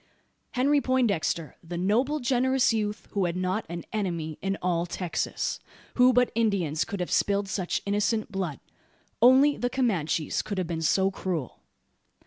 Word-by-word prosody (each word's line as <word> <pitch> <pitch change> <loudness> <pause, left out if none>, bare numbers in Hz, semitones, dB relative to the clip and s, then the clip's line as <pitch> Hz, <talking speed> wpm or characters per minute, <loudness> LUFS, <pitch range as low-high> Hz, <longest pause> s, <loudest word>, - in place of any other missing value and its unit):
Henry 280 +3 +3
Poindexter 205 - 0
the 170 +1 -6
noble 240 - +1
generous 260 -1 +2
youth 210 -1 -2
who 200 -3 0
had 170 0 -2
not 185 +4 -1
an 170 0 -5
enemy 170 -7 -3
in 195 0 -1
all 175 -1 0
Texas! 175 0 -2 0.3
Who 250 0 +5
but 250 0 +3
Indians 195 -9 +1
could 200 - -5
have 180 - -3
spilled 200 0 +1
such 185 -2 -2
innocent 210 +2 0
blood? 185 -7 -3 0.6
Only 265 +4 +6
the 245 - -1
Comanches 180 - 0
could 205 - -5
have 185 - 0
been 165 -1 -3
so 190 +4 +2
cruel? 175 -8 -4
200 Hz, 150 wpm, -27 LUFS, 175-245 Hz, 0.6 s, Only